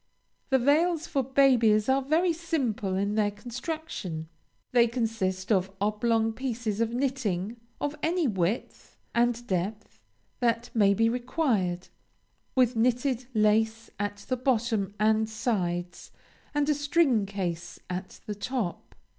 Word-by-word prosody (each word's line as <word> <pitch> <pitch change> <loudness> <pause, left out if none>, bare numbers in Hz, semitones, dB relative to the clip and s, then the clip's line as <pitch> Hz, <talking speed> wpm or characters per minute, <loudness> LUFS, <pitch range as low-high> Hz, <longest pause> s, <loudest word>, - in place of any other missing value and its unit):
The 265 - +5
veils 315 +5 +2
for 280 -5 0
babies 245 -5 +4
are 265 +1 +3
very 325 +6 +2
simple 260 - -1
in 200 +2 0
their 210 -1 +2
construction; 225 - -5 0.4
they 240 -1 +5
consist 225 -5 -2
of 190 -2 +3
oblong 220 +2 +1
pieces 230 -4 -2
of 230 0 +1
knitting 235 -6 -1 0.2
of 290 +1 -2
any 335 -1 +1
width 195 +1 -2 0.2
and 240 0 +1
depth 200 +2 -3 0.4
that 235 0 0
may 200 -3 +4
be 225 +3 +3
required, 230 - 0 0.7
with 250 -2 +3
knitted 245 +2 +1
lace 220 +1 +2
at 205 0 -3
the 255 - 0
bottom 225 -5 0
and 220 +1 +3
sides, 180 -6 -2 0.5
and 290 0 +2
a 300 - +4
string 290 -7 +2
case 175 -4 -4
at 185 +1 -6
the 210 - -3
top. 210 -3 -4
225 Hz, 130 wpm, -28 LUFS, 205-260 Hz, 0.7 s, The